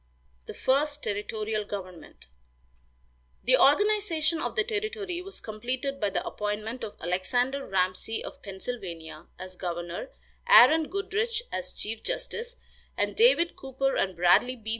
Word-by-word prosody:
THE - - -7
FIRST 290 +2 +1
TERRITORIAL 210 +1 -2
GOVERNMENT. 185 -4 -8 1.2
The - - +5
organization 335 -1 +3
of - - -3
the 470 - +3
territory 420 -5 -3
was 390 +2 -6
completed 255 +6 -3
by 205 - +1
the - - -2
appointment 215 +3 -3
of 205 - -6
Alexander 245 +11 0
Ramsey 185 +4 -1
of - - -9
Pennsylvania 190 -6 -7
as 185 0 -9
governor, 175 - -4 0.4
Aaron 320 -10 +8
Goodrich 430 +4 -1
as - - -4
chief 220 +1 -5
justice, - - -4 0.4
and - - 0
David 440 -8 +4
Cooper 270 0 -1
and 190 -1 0
Bradley 185 +9 +4
B. 220 -3 -8
250 Hz, 130 wpm, -28 LUFS, -, 1.2 s, Aaron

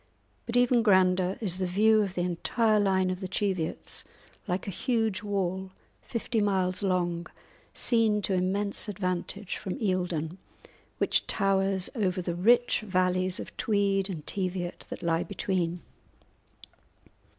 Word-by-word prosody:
But 235 +1 0
even 245 -1 +4
grander 185 -3 +3
is 185 -4 +1
the 185 - 0
view 215 +4 +4
of 195 -3 -2
the 175 - 0
entire 215 +5 +1
line 190 -2 +2
of 185 - -4
the 190 - -4
Cheviots, 185 -4 -2 0.4
like 180 -1 -2
a - - -2
huge 225 -2 0
wall, 190 -2 -2 0.3
fifty 230 -1 -2
miles 190 -2 +1
long, 175 -3 0 0.5
seen 220 -3 +2
to 195 - 0
immense 200 +4 0
advantage 185 0 -3
from 190 +1 -5
Eildon, 180 - -1 0.6
which - - +2
towers 195 -1 +1
over 190 -6 0
the 175 -1 -2
rich 235 +8 +3
valleys 185 -2 0
of - - -8
Tweed 200 -2 +1
and 160 -6 -6
Teviot 180 -2 -3
that - - -7
lie 165 0 +1
between. 180 -3 -2
190 Hz, 135 wpm, -28 LUFS, 180-205 Hz, 0.6 s, even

